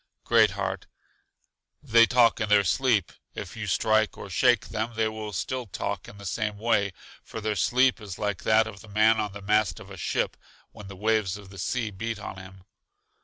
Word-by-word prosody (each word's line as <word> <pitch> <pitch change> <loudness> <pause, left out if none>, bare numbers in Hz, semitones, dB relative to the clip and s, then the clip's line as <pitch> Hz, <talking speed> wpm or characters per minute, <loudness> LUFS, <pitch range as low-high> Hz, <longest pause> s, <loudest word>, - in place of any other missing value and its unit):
Great 110 -2 +5
heart: 95 -1 -3 1.0
They 115 0 +5
talk 120 -1 +4
in 105 - -1
their 105 -1 +5
sleep. 100 +3 +1 0.2
If - - -7
you - - -5
strike 110 -1 +2
or 100 - -9
shake 120 +3 +3
them, 115 +1 -3
they 110 0 +1
will 110 -1 -5
still 125 +6 -3
talk - - -4
in 105 - -12
the 100 - -11
same 105 +2 -2
way, 105 -2 +1 0.3
for - - -7
their 110 -1 -2
sleep 125 +7 +2
is 100 -4 -7
like 105 -3 -2
that 110 0 +4
of 105 -3 -9
the 110 - -14
man 110 +2 +3
on 105 -1 -2
the 100 -1 -9
mast 105 +2 +1
of 100 -2 -12
a 95 - -9
ship, - - -1 0.4
when 105 - -11
the 100 - -9
waves 105 -1 0
of 100 -2 -13
the 100 - -11
sea 115 +3 -2
beat 110 +3 -4
on 100 -2 -7
him. 95 0 -12
105 Hz, 205 wpm, -26 LUFS, 100-110 Hz, 1.0 s, Great